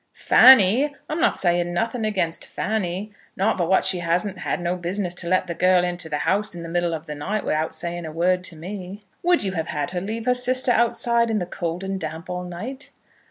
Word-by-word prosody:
"Fanny! 260 Hz, +3 st, +6 dB
I'm 310 Hz, +2 st, -3 dB
not -, -, +2 dB
saying 175 Hz, -1 st, +1 dB
nothing 225 Hz, +3 st, -1 dB
against 185 Hz, -6 st, -1 dB
Fanny. 205 Hz, -1 st, -3 dB, 0.3 s
Not 195 Hz, +3 st, +2 dB
but 175 Hz, -2 st, -1 dB
what 190 Hz, -, +3 dB
she 190 Hz, -1 st, +1 dB
hadn't 180 Hz, +4 st, -1 dB, 0.3 s
no 175 Hz, +1 st, 0 dB
business 180 Hz, +1 st, -3 dB
to 175 Hz, -1 st, -5 dB
let 185 Hz, +1 st, +2 dB
the 170 Hz, -, -4 dB
girl 180 Hz, +1 st, +3 dB
into 175 Hz, -2 st, -3 dB
the 150 Hz, -, -1 dB
house 205 Hz, +4 st, 0 dB
in 170 Hz, -, -7 dB
the 165 Hz, -, -7 dB
middle 175 Hz, -1 st, 0 dB
of 160 Hz, -, -8 dB
the 150 Hz, -, -6 dB
night 195 Hz, +9 st, -3 dB
without 155 Hz, +1 st, -1 dB
saying 170 Hz, -1 st, -4 dB
a -, -, -6 dB
word 180 Hz, +3 st, +1 dB
to 175 Hz, -, -4 dB
me." 185 Hz, +4 st, -8 dB, 0.2 s
"Would 350 Hz, -5 st, +3 dB
you 195 Hz, -, -1 dB
have 165 Hz, -3 st, -3 dB
had 150 Hz, 0 st, -3 dB
her 180 Hz, -1 st, -3 dB
leave 220 Hz, +4 st, -4 dB
her 250 Hz, -, +3 dB
sister 250 Hz, +1 st, +3 dB
outside 235 Hz, 0 st, +2 dB
in 220 Hz, -, 0 dB
the 180 Hz, -, -1 dB
cold 170 Hz, +1 st, -4 dB
and 195 Hz, 0 st, -3 dB
damp 160 Hz, +2 st, -6 dB
all 180 Hz, 0 st, -4 dB
night?" 225 Hz, +11 st, -7 dB
185 Hz, 220 wpm, -23 LUFS, 175-215 Hz, 0.3 s, Fanny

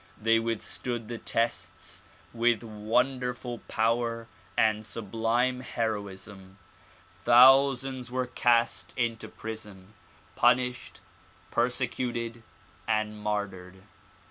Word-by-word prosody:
They 115 Hz, +1 st, +3 dB
withstood 115 Hz, +1 st, -3 dB
the 120 Hz, -1 st, -5 dB
tests 115 Hz, +1 st, -2 dB, 0.3 s
with 120 Hz, -1 st, +2 dB
wonderful 125 Hz, +3 st, -1 dB
power 115 Hz, +1 st, 0 dB, 0.3 s
and 110 Hz, -1 st, +3 dB
sublime 115 Hz, +4 st, 0 dB
heroism. 100 Hz, -5 st, -5 dB, 0.6 s
Thousands 130 Hz, 0 st, +5 dB
were 130 Hz, +1 st, -1 dB
cast 120 Hz, -1 st, +1 dB
into 115 Hz, -2 st, -1 dB
prison, 105 Hz, -3 st, -9 dB, 0.4 s
punished, 125 Hz, 0 st, +1 dB, 0.5 s
persecuted 120 Hz, -1 st, -1 dB, 0.5 s
and 110 Hz, -1 st, 0 dB
martyred. 95 Hz, -3 st, -4 dB
115 Hz, 80 wpm, -28 LUFS, 110-125 Hz, 0.6 s, Thousands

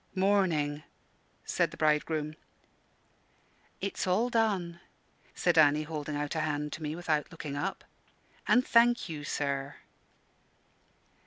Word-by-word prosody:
"Morning!" 180 Hz, -7 st, +2 dB, 0.6 s
said -, -, +1 dB
the -, -, -12 dB
bridegroom. 155 Hz, 0 st, +1 dB, 1.5 s
"It's 195 Hz, -1 st, -2 dB
all 225 Hz, +7 st, +2 dB
done," 195 Hz, -7 st, 0 dB, 0.6 s
said 175 Hz, -2 st, +3 dB
Annie, 150 Hz, 0 st, +5 dB
holding 150 Hz, -1 st, -5 dB
out 145 Hz, 0 st, -2 dB
a 160 Hz, -, -1 dB
hand 150 Hz, -1 st, -2 dB
to -, -, -7 dB
me, 155 Hz, 0 st, -3 dB
without 160 Hz, -3 st, -1 dB
looking 155 Hz, -4 st, -6 dB
up. 190 Hz, +7 st, -3 dB, 0.6 s
"And 250 Hz, +1 st, +4 dB
thank 240 Hz, +1 st, +4 dB
you, 150 Hz, -2 st, -5 dB
sir." 140 Hz, -1 st, -2 dB
155 Hz, 115 wpm, -30 LUFS, 150-185 Hz, 1.5 s, Annie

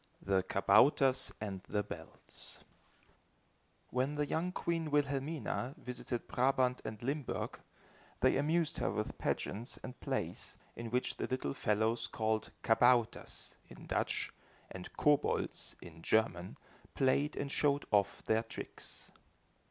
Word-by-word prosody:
THE 95 Hz, -1 st, +2 dB
KABOUTERS 125 Hz, +8 st, +4 dB
AND 100 Hz, -3 st, -4 dB
THE 105 Hz, 0 st, +1 dB
BELLS 105 Hz, -, -6 dB, 1.3 s
When 130 Hz, +3 st, +1 dB
the 150 Hz, 0 st, 0 dB
young 165 Hz, +5 st, 0 dB
queen 165 Hz, -3 st, -1 dB
Wilhelmina 145 Hz, -1 st, 0 dB
visited 125 Hz, -3 st, -4 dB
Brabant 130 Hz, 0 st, +2 dB
and 110 Hz, +1 st, -6 dB
Limburg, 140 Hz, +1 st, -2 dB, 0.6 s
they -, -, +5 dB
amused 160 Hz, +3 st, +2 dB
her -, -, +1 dB
with 105 Hz, +2 st, -3 dB
pageants 115 Hz, +5 st, -2 dB
and 125 Hz, -, -7 dB
plays, -, -, -3 dB, 0.2 s
in 115 Hz, -1 st, -5 dB
which 125 Hz, +2 st, 0 dB
the -, -, -2 dB
little 130 Hz, -, -1 dB
fellows 110 Hz, +6 st, +2 dB
called 110 Hz, -1 st, 0 dB
kabouters, 120 Hz, 0 st, +3 dB
in -, -, -11 dB
Dutch, -, -, 0 dB, 0.4 s
and 90 Hz, -1 st, -7 dB
kobolds 150 Hz, -1 st, +1 dB
in 80 Hz, -1 st, -11 dB
German, 95 Hz, -3 st, +1 dB, 0.4 s
played 140 Hz, +3 st, +2 dB
and 140 Hz, -1 st, -3 dB
showed 145 Hz, -1 st, +2 dB
off 100 Hz, -2 st, +2 dB
their 110 Hz, 0 st, +3 dB
tricks. 115 Hz, -, -8 dB
125 Hz, 120 wpm, -35 LUFS, 110-140 Hz, 1.3 s, they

